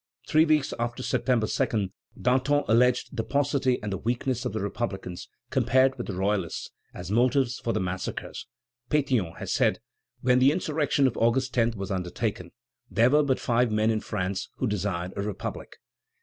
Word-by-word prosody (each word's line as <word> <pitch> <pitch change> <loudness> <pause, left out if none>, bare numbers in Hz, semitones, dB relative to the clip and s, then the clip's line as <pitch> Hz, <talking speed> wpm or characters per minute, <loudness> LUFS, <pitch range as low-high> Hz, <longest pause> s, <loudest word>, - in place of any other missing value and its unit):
Three 155 +1 +5
weeks 155 -3 +2
after 120 +2 -2
September 125 -4 +1
2, 110 -5 0 0.3
Danton 135 +3 +2
alleged 125 +4 +3
the 115 - -1
paucity 140 -1 +1
and 105 -2 -2
the 95 - -3
weakness 120 +1 -1
of - - -2
the 110 - -2
republicans, 95 -4 -4 0.2
compared 130 +1 +3
with 120 - -6
the 100 - -4
royalists, 95 -2 -1 0.2
as 90 +1 -7
motives 125 +2 +2
for 115 - -2
the 110 - 0
massacres. 95 -1 -4 0.4
Pétion 130 - +1
has - - -3
said: - - +2 0.4
"When 125 0 +4
the 130 +2 +6
insurrection 150 -4 +1
of 130 - +1
August 125 +2 +2
10 115 -1 +2
was 95 0 -5
undertaken, 90 0 -3 0.4
there 115 +3 +3
were 150 +1 +5
but 135 -3 +1
five 120 -1 +1
men 110 +1 +2
in 110 -1 -1
France 95 +1 -3
who - - -2
desired 95 -4 -2
a 100 - -2
republic." 105 -1 -5
120 Hz, 170 wpm, -27 LUFS, 100-130 Hz, 0.4 s, the